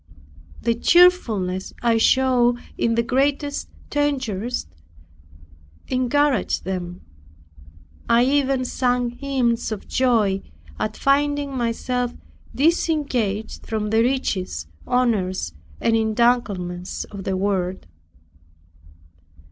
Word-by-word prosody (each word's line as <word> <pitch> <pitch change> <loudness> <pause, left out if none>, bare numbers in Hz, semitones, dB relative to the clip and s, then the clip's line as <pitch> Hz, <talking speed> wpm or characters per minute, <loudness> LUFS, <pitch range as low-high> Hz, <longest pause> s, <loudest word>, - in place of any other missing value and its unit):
The 235 - +2
cheerfulness 230 - +3
I 230 -1 +3
showed 245 -1 +3 0.2
in 230 0 +1
the 235 - +2
greatest 280 +4 0 0.2
dangers 255 -6 -1 1.2
encouraged 255 -2 +1
them. 180 -1 -4 1.1
I 235 +1 +5
even 270 -1 +1
sang 245 -1 0
hymns 245 -3 -1
of 215 - -5
joy 220 -7 +2 0.4
at 215 0 -2
finding 285 0 +1
myself 245 0 -1 0.4
disengaged 275 - 0
from 215 -1 -2
the 220 +1 +4
riches, 205 - -1 0.2
honors 205 - 0 0.3
and 225 - +2
entanglements 215 -6 0
of 200 -2 -9
the 190 0 -1
world. 190 -1 -1
235 Hz, 90 wpm, -22 LUFS, 205-265 Hz, 1.2 s, I